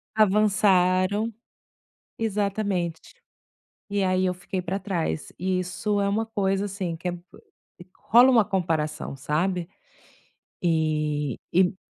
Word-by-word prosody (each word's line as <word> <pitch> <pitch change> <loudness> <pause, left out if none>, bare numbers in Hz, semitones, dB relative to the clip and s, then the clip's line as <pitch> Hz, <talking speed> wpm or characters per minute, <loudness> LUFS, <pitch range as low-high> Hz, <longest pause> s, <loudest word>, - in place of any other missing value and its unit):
Avançaram, 205 0 +3 0.9
exatamente, 200 -5 -2 0.7
e 200 -1 0
aí 185 0 +2
eu 180 - 0
fiquei 180 +1 -4
para 185 +3 -3
trás, 165 - -3
e 185 +1 0
isso 200 +3 -1
é 200 - +1
uma 220 +2 0
coisa 195 -2 0
assim 190 -4 -4
que 180 - -4
é - - -1
bo 175 0 -9 0.7
rola 240 +3 +5
uma 230 -4 +5
comparação 160 -8 -2
sabe, 170 +5 -1 0.9
e 155 -4 0 0.2
e 185 +1 +3
185 Hz, 115 wpm, -25 LUFS, 170-205 Hz, 0.9 s, rola